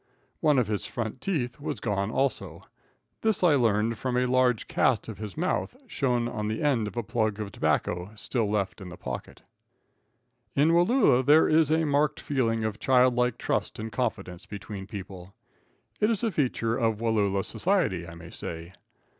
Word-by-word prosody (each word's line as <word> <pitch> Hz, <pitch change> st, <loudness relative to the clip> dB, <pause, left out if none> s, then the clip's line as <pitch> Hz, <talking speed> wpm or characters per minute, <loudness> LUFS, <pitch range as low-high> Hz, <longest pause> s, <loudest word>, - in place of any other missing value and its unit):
One 150 Hz, -2 st, +3 dB
of 125 Hz, -, +3 dB
his 105 Hz, -1 st, -3 dB
front 120 Hz, +1 st, -4 dB
teeth 140 Hz, -10 st, -2 dB
was -, -, -4 dB
gone, 100 Hz, -2 st, -1 dB
also. 105 Hz, -, -2 dB, 0.6 s
This 220 Hz, -4 st, +1 dB
I 170 Hz, -4 st, +6 dB
learned 115 Hz, -3 st, +2 dB
from 125 Hz, -1 st, -1 dB
a 125 Hz, -, +2 dB
large 125 Hz, -2 st, +2 dB
cast 115 Hz, -6 st, +1 dB
of 110 Hz, -3 st, -7 dB
his 105 Hz, +2 st, -7 dB
mouth, 180 Hz, +8 st, -1 dB
shown 125 Hz, -, 0 dB
on 105 Hz, -3 st, -3 dB
the 110 Hz, +5 st, -2 dB
end 125 Hz, -8 st, +2 dB
of 105 Hz, -, -8 dB
a 120 Hz, -, 0 dB
plug 110 Hz, -1 st, -1 dB
of 105 Hz, -2 st, -4 dB
tobacco 90 Hz, 0 st, -1 dB
still 110 Hz, 0 st, -1 dB
left 105 Hz, -1 st, -1 dB
in 95 Hz, -, -8 dB
the 90 Hz, -, -10 dB
pocket. -, -, -7 dB, 1.1 s
[Illustration: 150 Hz, +4 st, +4 dB
IN -, -, +4 dB
SUSPENSE.] 175 Hz, +4 st, +4 dB
In 265 Hz, -, +2 dB
Wallula 125 Hz, +1 st, +3 dB
there 155 Hz, +2 st, +6 dB
is 155 Hz, -1 st, +4 dB
a 160 Hz, 0 st, +3 dB
marked 145 Hz, +1 st, +1 dB
feeling 115 Hz, -5 st, 0 dB
of 110 Hz, 0 st, -3 dB
childlike 125 Hz, -2 st, +3 dB
trust -, -, -2 dB
and 110 Hz, +1 st, -5 dB
confidence 100 Hz, -8 st, -3 dB
between 100 Hz, -1 st, -7 dB
people. 95 Hz, -2 st, -9 dB, 0.6 s
It 210 Hz, -, +3 dB
is 230 Hz, -1 st, 0 dB
a 225 Hz, -, +1 dB
feature 125 Hz, -7 st, 0 dB
of 115 Hz, -2 st, +1 dB
Wallula 105 Hz, -4 st, +1 dB
society, 160 Hz, -, 0 dB
I 85 Hz, -, -9 dB
may 85 Hz, 0 st, -11 dB
say. 85 Hz, +2 st, -7 dB
115 Hz, 185 wpm, -27 LUFS, 105-135 Hz, 1.1 s, I